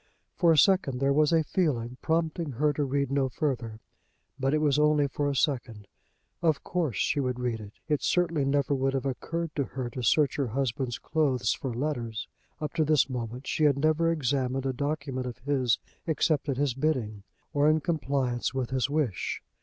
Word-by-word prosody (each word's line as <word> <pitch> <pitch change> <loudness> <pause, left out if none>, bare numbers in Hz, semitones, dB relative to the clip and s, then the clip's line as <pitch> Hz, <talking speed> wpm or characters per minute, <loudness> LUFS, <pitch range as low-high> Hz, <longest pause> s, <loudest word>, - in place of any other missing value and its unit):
For 170 -3 +4
a 160 - +4
second 145 -4 +4
there 140 +1 +2
was 150 +2 +3
a 165 -1 +4
feeling 125 -9 -1
prompting 160 -2 -1
her 150 +5 +1
to 145 - -1
read 140 0 -1
no 140 -1 +1
further. 120 -6 -3 0.6
But 135 0 +1
it 155 - +3
was 150 -1 +2
only 150 -1 +4
for 145 +1 -1
a 140 - -2
second. 120 -8 -1 0.5
Of 160 -4 +1
course 165 - -1
she - - +1
would 125 -2 -1
read 120 -2 -1
it. 105 -1 -10
It 150 -2 +1
certainly 170 -5 +1
never 140 +1 +1
would 135 0 0
have 135 - -1
occurred 165 +5 -3
to 140 - +2
her 125 -2 -5
to 130 - -5
search 140 +4 +3
her 140 -3 0
husband's 125 0 -2
clothes 130 -7 +1
for 135 - -4
letters. 120 -3 -3 0.3
Up 150 -1 -4
to 165 -2 +2
this 150 -3 +3
moment 125 +1 -5
she 155 - +1
had 140 -2 +4
never 155 +3 +2
examined 135 -3 0
a 135 - 0
document 140 -2 -3
of 120 -3 -6
his 130 -3 +1 0.3
except 155 -2 +1
at 135 - 0
his 140 -2 +1
bidding 125 -7 -1 0.3
or 145 +1 +4
in 155 +1 +3
compliance 135 -6 -1
with 130 -2 -2
his 130 0 0
wish. 145 - -1
140 Hz, 195 wpm, -28 LUFS, 125-150 Hz, 0.6 s, For